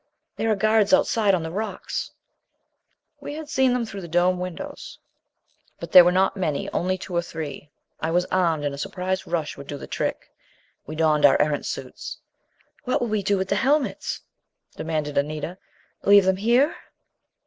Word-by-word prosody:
"There 225 - -1
are 215 - +3
guards 215 0 +3
outside 210 -4 +2
on 170 - -2
the 160 - -5
rocks." 200 +1 -4 1.1
We 290 - -7
had 310 -1 -7
seen 265 -2 +3
them 245 -1 0
through 200 -3 -7
the 175 - -7
dome 175 +2 +2
windows. 185 - -7 0.8
But - - -7
there 180 -2 +11
were 175 - +4
not 190 +2 +2
many, 155 -7 -2
only 185 +1 0
two 180 -1 -7
or 170 - +3
three. 155 -4 -7 0.3
I 160 - -2
was 175 +2 +2
armed 165 -5 +1
and 145 - -1
a 140 - -7
surprise 185 +3 -3
rush 160 -3 -2
would 140 0 -10
do 145 - -5
the - - -8
trick. - - -3 0.6
We 155 - -6
donned 155 -2 +2
our 145 - +6
Erentz 150 -1 0
suits. 130 -1 -6 0.7
"What 255 - 0
will 240 - -2
we 215 -1 0
do 200 +1 +1
with 190 0 -2
the 200 - +2
helmets?" 280 +4 0 0.5
demanded 155 -3 -1
Anita. 155 +5 -4 0.4
"Leave 200 -1 +6
them 190 0 +2
here?" 240 - +3
185 Hz, 180 wpm, -24 LUFS, 160-210 Hz, 1.1 s, there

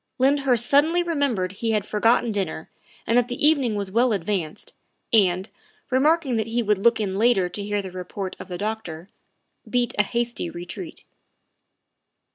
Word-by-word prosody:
Lyndhurst 265 -3 +2
suddenly 315 +7 +3
remembered 280 - -1
he 225 +3 -2
had 210 -2 0
forgotten 225 +2 +2
dinner 185 -6 -4 0.3
and 230 - +1
that 245 - 0
the 245 +4 +1
evening 270 -8 +2
was 200 -2 -4
well 235 +2 +3
advanced, 190 -2 -3 0.4
and, 185 -3 +3 0.4
re 260 - +3
marking 300 -4 +2
that 220 0 -1
he 235 +1 0
would 210 -2 +1
look 230 +3 +3
in 195 -2 -2
later 225 -5 +3
to 205 - -5
hear 205 0 -2
the 190 - -7
report 185 +1 -6
of - - -8
the 180 -2 -5
doctor, 200 -5 -5 0.6
beat 245 -2 0
a - - +9
hasty 235 -3 -2
retreat. 175 - -8
220 Hz, 165 wpm, -23 LUFS, 195-245 Hz, 0.6 s, a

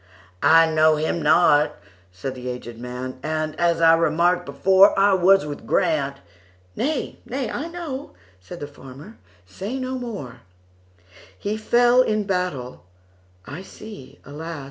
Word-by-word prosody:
"I 165 +3 +6
know 155 0 +4
him 160 +2 -2
not," 150 -3 +4 0.4
said 95 +9 -6
the 125 -1 -7
aged 120 -2 -7
man,"And, 130 +6 -4
as 170 -1 +2
I 165 0 +7
remarked 170 +2 +2
before,I 195 +7 +4
was 190 -1 +4
with 145 -1 -8
Grant"—"Nay, 95 - -3
nay, 260 -1 -4
I 310 - -4
know,"Said 180 - -9
the - - -3
farmer, 145 - -13 0.3
"say 195 - -6
no 260 0 -4
more:"He 90 - -10
fell 240 +3 +4
in 215 -4 0
battle,—I 95 - -6
see, 190 -9 -12
alas! 160 +3 -7
155 Hz, 115 wpm, -22 LUFS, 120-195 Hz, 0.4 s, I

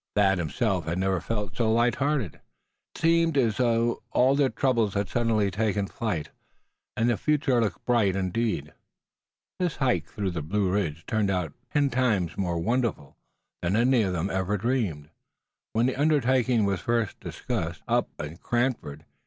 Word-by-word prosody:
Thad 95 -3 +3
himself 90 - -1
had 85 +2 -2
never 95 -1 0
felt 105 -4 -3
so 115 -2 +1
light 120 +2 +3
hearted. 135 - -1 0.6
It - - -9
seemed 165 -2 +3
as 115 -6 +2
though 120 -1 +1
all 130 +2 +3
of 140 - +1
their 140 -2 +4
troubles 115 -8 +1
had 100 0 0
suddenly 110 -3 +1
taken 105 0 0
flight, 100 -7 -3 0.7
and 115 - +2
the 120 -2 +2
future 150 -5 +2
looked 105 -3 -2
bright 110 -6 +2
indeed. 95 -5 -1 0.9
This 180 -4 0
hike 130 -3 0
through 100 -3 -3
the 85 -2 -3
Blue 95 +5 0
Ridge 95 -7 0
had - - -33
turned 110 -2 +1
out 90 -6 -1 0.2
ten 145 -2 +2
times 110 -9 +1
more 90 -3 -1
wonderful 115 - -1 0.5
than 90 +3 0
any 120 +2 +4
of 95 -3 0
them 90 +2 -1
had 95 - -1
ever 95 +2 0
dreamed, 100 - -1 0.6
when 115 +2 +2
the 130 - 0
undertaking 130 -6 +3
was 100 -2 -1
first 115 -3 -1
discussed, - - -4
away - - +3
up - - -5
in 75 +3 -6
Cranford. 120 - -2
110 Hz, 175 wpm, -26 LUFS, 95-125 Hz, 0.9 s, their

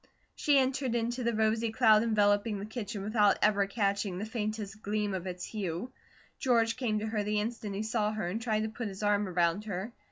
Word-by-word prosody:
She 290 -2 +3
entered 260 -2 +1
into 240 +2 -1
the 235 -1 0
rosy 220 +1 +1
cloud 220 -2 +5
enveloping 210 -1 +2
the 200 - -5
kitchen 215 -2 -5
without 210 -1 +3
ever 205 -2 +3
catching 200 -2 -1
the 205 - -3
faintest 215 -2 -4
gleam 210 -1 -1
of 190 -1 -4
its 180 -1 -5
hue. 195 +2 -4 0.5
George 230 -3 +2
came 235 -5 -1
to 210 - -2
her 220 -1 -1
the 210 +1 0
instant 215 -2 -4
he 205 - -2
saw 215 -1 0
her 215 -5 -3
and 210 +6 -3
tried 220 -2 0
to 220 - -2
put 225 +1 -5
his 195 +1 -7
arm 205 0 +2
around 175 +2 +1
her. 205 +3 -4
215 Hz, 210 wpm, -30 LUFS, 200-230 Hz, 0.5 s, cloud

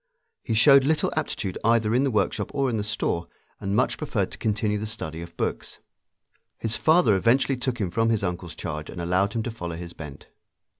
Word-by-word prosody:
He 115 - -2
showed 135 +4 +7
little 150 +2 +1
aptitude 105 -11 -2
either 115 -1 +3
in 125 +3 +3
the 140 - +2
workshop 105 -5 0
or 135 -2 +1
in 115 - -1
the 105 - -1
store, 105 -5 -1 0.3
and 100 +1 -2
much - - +1
preferred - - -1
to - - -10
continue 105 -1 0
the 110 - -4
study 85 -7 -5
of 85 0 -10
books. - - -3 0.8
His 115 0 -2
father 155 - +4
eventually 130 +7 +3
took 125 -1 -2
him 95 -7 -2
from 115 +4 +1
his 110 -3 +1
uncle's 90 -2 -3
charge 75 -3 -5
and - - -7
allowed 90 +4 +1
him 115 -2 -1
to 120 - -3
follow 85 -7 -5
his 85 0 -7
bent. 75 -4 -9
105 Hz, 205 wpm, -25 LUFS, 90-120 Hz, 0.8 s, showed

